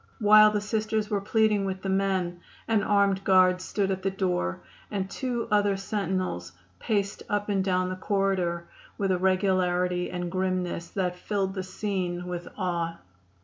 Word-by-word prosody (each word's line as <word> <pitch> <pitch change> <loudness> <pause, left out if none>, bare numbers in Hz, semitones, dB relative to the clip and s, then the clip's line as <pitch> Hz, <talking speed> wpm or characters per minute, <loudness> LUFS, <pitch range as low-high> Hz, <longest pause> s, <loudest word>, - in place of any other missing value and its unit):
While 215 0 +7
the 210 -1 -1
Sisters 215 0 -1
were 205 -1 +1
pleading 215 0 +2
with 190 -1 -4
the - - -3
men 190 -3 0 0.3
an 225 -2 +3
armed 200 -2 +2
guard 185 -1 +4
stood 195 +1 -1
at 190 0 -2
the 195 - 0
door 180 - -1 0.3
and 195 -2 -2
two 245 +2 -3
other 205 -1 +3
sentinels 185 - -2 0.3
paced 200 -2 -1
up 205 0 -1
and 195 -2 +1
down 185 -1 +1
the 185 - -3
corridor 185 -3 0 0.3
with 195 -2 0
a 180 - +1
regularity 180 -1 +1
and 175 -1 -4
grimness 185 -2 -1
that 180 -2 -2
filled 195 -1 -1
the 190 - -3
scene 185 -2 -3
with 175 -1 -5
awe. 170 -2 -2
190 Hz, 160 wpm, -27 LUFS, 180-205 Hz, 0.3 s, While